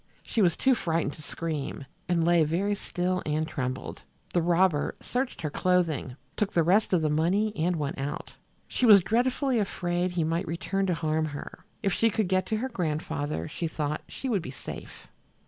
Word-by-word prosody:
She 225 - 0
was 175 -4 +3
too 265 - +4
frightened 165 - 0
to 155 - -12
scream, 150 -2 -4 0.2
and 170 -2 +2
lay 170 -1 +5
very 180 +7 +1
still 185 -2 -1
and 155 +1 -1
trembled. 130 -4 -4 0.3
The 175 - +3
robber 170 -2 +2
searched 250 -6 -3
her 150 - -1
clothing, 165 -8 +1 0.2
took 210 -2 -1
the 170 - +4
rest 195 +6 +3
of 175 -4 +3
the 155 - +2
money 195 +8 +2
and 170 +3 +1
went 145 -4 -3
out. 140 +2 -4 0.3
She 250 - +1
was 200 -4 +9
dreadfully 250 +4 +1
afraid 175 -3 0
he 175 -2 +1
might 165 +2 -1
return 195 +4 -1
to 180 - +1
harm 155 -1 0
her. 145 -2 -7 0.2
If 195 - +2
she 225 - +3
could 215 -3 0
get 185 0 +2
to 220 - 0
her 260 +4 -2
grandfather, 155 - -2
she 165 +2 -3
thought, 150 -1 -2
she 270 - -5
would 215 -7 +1
be - - -7
safe. 135 - -9
175 Hz, 190 wpm, -28 LUFS, 155-195 Hz, 0.3 s, was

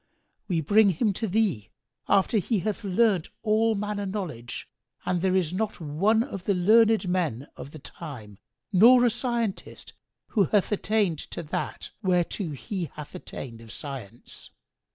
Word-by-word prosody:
We 175 -5 0
bring 205 +7 +5
him 200 +4 +1
to 220 +4 -2
thee, 190 - 0 0.4
after 200 +3 +3
he 205 +1 0
hath 215 +1 -3
learnt 195 -2 +2
all 220 +1 +3
manner 205 0 -3
knowledge, 160 - -5 0.4
and 180 -2 0
there 190 0 +2
is 180 -3 +1
not 215 +3 -2
one 190 +9 +2
of 195 -8 -7
the 200 - +2
learned 215 +3 +4
men 165 -9 -1
of - - -8
the 155 - -10
time 125 - -10 0.3
nor 240 +6 +7
a 240 - +4
scientist 235 -3 -3 0.4
who 205 -5 +3
hath 205 +5 +1
attained 205 -5 +1
to 170 - -5
that 150 - -4
whereto 180 -1 0
he 170 +5 -4
hath 150 -1 -9
attained 115 -4 -8
of 115 -1 -12
science." 125 -6 -8
190 Hz, 155 wpm, -26 LUFS, 155-215 Hz, 0.4 s, nor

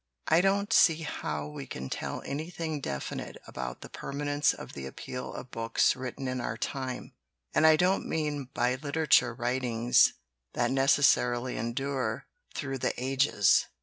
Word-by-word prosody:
"I 165 +2 +5
don't 200 +3 +1
see 165 -2 +5
how 75 - -3
we 75 - -8
can 65 - -6
tell - - -4
anything 160 +1 -4
definite 70 - -5
about 60 -1 -6
the - - -9
permanence 145 +1 0
of - - -9
the 65 -1 -6
appeal 125 - -6
of 125 - -8
books 115 0 +2
written 130 +1 -5
in 125 -1 -2
our - - -3
time. 130 -2 -4 0.4
And 160 - +5
I 160 - +8
don't 180 +4 +2
mean 150 -4 -2
by 125 -1 +1
litera 155 +2 -2
ture 120 - +5
writings 120 -1 +3 0.4
that - - +1
necessarily 130 -2 +3
endure 130 +4 -2 0.3
through 135 -2 -3
the - - 0
ages. 130 -5 +3
135 Hz, 150 wpm, -29 LUFS, 120-150 Hz, 0.4 s, I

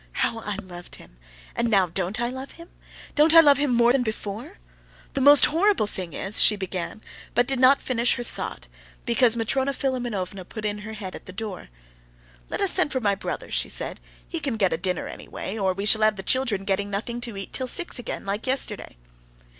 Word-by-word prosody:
How 230 - -1
I 210 -2 -4
loved 180 -3 -9
him! - - -16 0.4
And 235 - 0
now 195 -4 +4
don't 185 +5 -2
I 240 +1 -1
love 260 +1 -8
him? 335 0 -14 0.4
Don't 310 +2 +5
I - - +11
love 290 -4 +6
him 290 -2 +1
more 240 0 +4
than 265 0 +2
before? 220 - -5 0.6
The 275 - -2
most 285 0 +8
horrible 370 - +2
thing 185 -4 -6
is," 195 +2 +2
she 215 - +7
began, 190 +2 -5 0.3
but 245 - +3
did 270 0 0
not 260 +2 +5
finish 245 -1 +1
her 240 - -5
thought, - - -7 0.4
because 235 -1 +3
Matrona 265 +4 -1
Philimonovna 235 -9 -3
put 215 +4 -8
her 210 +1 -4
head 200 -4 -7
in - - -6
at - - -23
the - - -7
door. 200 - -7 0.8
"Let - - -3
us - - +5
send - - +3
for 260 - -1
my 205 -4 +1
brother," 195 - -6
she - - -1
said; - - +1 0.3
"he 335 - -4
can 275 -7 -2
get 195 -4 +2
a - - -1
dinner 180 0 -2
anyway, 195 - -7
or 195 -3 0
we 195 +2 -4
shall 215 +1 +5
have 215 0 +3
the 190 - -7
children 240 -5 0
getting 200 0 -1
nothing 230 +4 -4
to 235 -4 -7
eat 195 - -7
till 260 - -2
six 345 +1 +1
again, 235 - -5
like 200 +5 -3
yesterday." 260 - +1
225 Hz, 210 wpm, -24 LUFS, 195-260 Hz, 0.8 s, I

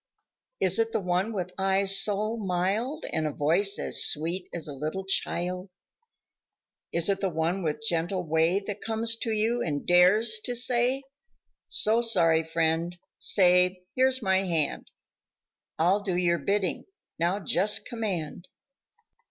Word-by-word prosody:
Is - - +4
it 455 0 0
the - - 0
one 185 +3 -1
with 180 -4 -5
eyes 195 0 +3
so 210 +2 -1
mild 210 - -2
And 155 -2 -2
voice 190 +7 +2
as - - +1
sweet 170 +5 -2
as 170 -3 -2
a 145 - -6
little 155 +7 -5
child 180 0 -2 1.2
Is 170 0 +1
it 200 -1 0
the 195 - 0
one 165 +3 -2
with 155 +4 -3
gentle 180 -1 -1
way 160 +4 +1
That 205 0 -6
comes 225 +1 -1
to 230 0 -3
you 225 +3 0
and 145 -3 -3
dares 210 +5 +4
to 245 - -2
say: 250 +2 +2 0.6
So 220 +2 +3
sorry, 165 -8 +3
friend; 165 +1 -1 0.2
say, 180 -1 +3
here's 260 -1 +2
my 190 -1 +2
hand, 170 -6 -1 0.9
I'll 180 +6 +2
do 190 -3 -3
your 170 -1 +1
bidding; 195 +4 -1 0.3
now 175 +4 0
just 205 +4 +1
command? 185 -7 -5
190 Hz, 140 wpm, -26 LUFS, 170-215 Hz, 1.2 s, Is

